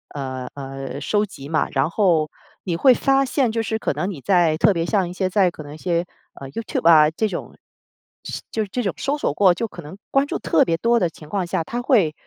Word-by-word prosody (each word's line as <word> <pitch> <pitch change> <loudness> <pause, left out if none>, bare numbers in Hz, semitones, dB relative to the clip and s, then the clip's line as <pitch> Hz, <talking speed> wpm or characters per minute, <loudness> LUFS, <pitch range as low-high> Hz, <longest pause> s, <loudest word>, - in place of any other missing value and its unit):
呃， 130 -2 -5
呃， 135 0 -6
收 205 +8 +1
集 140 -9 -11
嘛， 155 - +1
然 - - +1
后 165 -6 +2 0.3
你 175 - -2
会 255 +8 +5
发 270 +1 +3
现 255 -2 +1
就 225 0 -1
是 220 0 -2
可 - - -2
能 185 - -2
你 175 - -6
在 175 -3 +3
特 205 +5 +4
别 165 -2 -1
像 190 0 +1
一 175 - -7
些 185 0 -1
在 185 -2 +3
可 155 - -10
能 145 0 -10
一 - - -11
些， 170 0 0 0.4
呃 135 - -7
，YouTube 170 -2 0
啊 155 -2 +7
这 215 +7 0
种， 185 - -6 0.7
是 - - -5
就 220 - -1
是 205 - -8
这 245 - -1
种 195 - 0
搜 285 +2 -1
索 215 - -1
过 185 +1 +5
就 230 +6 -3
可 175 - -10
能 155 +5 -11
关 275 +1 +2
注 - - -2
特 160 - +3
别 165 - +1
多 235 +3 +2
的 175 - +1
情 155 -1 -14
况 190 -1 -2
下， 165 - -1
它 240 +8 -4
会 210 - +3
180 Hz, 295 characters per minute, -22 LUFS, 155-220 Hz, 0.7 s, 啊